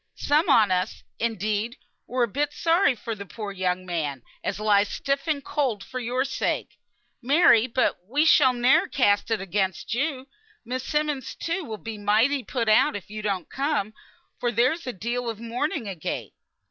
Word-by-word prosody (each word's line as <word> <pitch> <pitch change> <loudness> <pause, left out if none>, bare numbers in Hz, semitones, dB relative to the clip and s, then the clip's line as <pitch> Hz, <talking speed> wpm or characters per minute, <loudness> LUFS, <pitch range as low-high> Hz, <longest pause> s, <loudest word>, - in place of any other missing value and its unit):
Some 300 +4 +2
on 220 -7 +5
us, 185 +3 -1 0.2
indeed, 215 +1 -1 0.3
were 250 0 0
a - - +2
bit 290 +6 -1
sorry 330 -4 +3
for 230 0 -5
the 200 -2 -7
poor 205 +1 -7
young 185 -1 -1
man, 150 -8 -3 0.2
as - - -2
lies 205 -1 +3
stiff 275 +3 -2
and 285 -3 -1
cold 260 -9 -1
for 255 - -6
your 250 +2 -1
sake, 270 - -2 0.4
Mary; 255 -3 +5
but 255 +1 +1
we 290 +7 +2
shall 295 -4 +6
ne'er 245 +1 +3
cast 205 -6 +2
it 225 - +3
up 210 - -7
against 195 -1 -2
you. 270 +1 -2 0.4
Miss 255 +2 -3
Simmonds, 300 -4 -2
too, 340 +3 -3
will 220 -5 -5
be 220 -1 -7
mighty 225 +7 +2
put 235 -3 -2
out 215 -1 +4
if 200 0 -8
you 215 0 -5
don't 195 -5 -2
come, 270 -7 -1 0.5
for 240 - 0
there's 255 +8 +1
a - - -1
deal 235 +5 -3
of 225 -2 -5
mourning, 235 +2 -2
agait." 185 -6 -4
235 Hz, 180 wpm, -25 LUFS, 205-275 Hz, 0.5 s, shall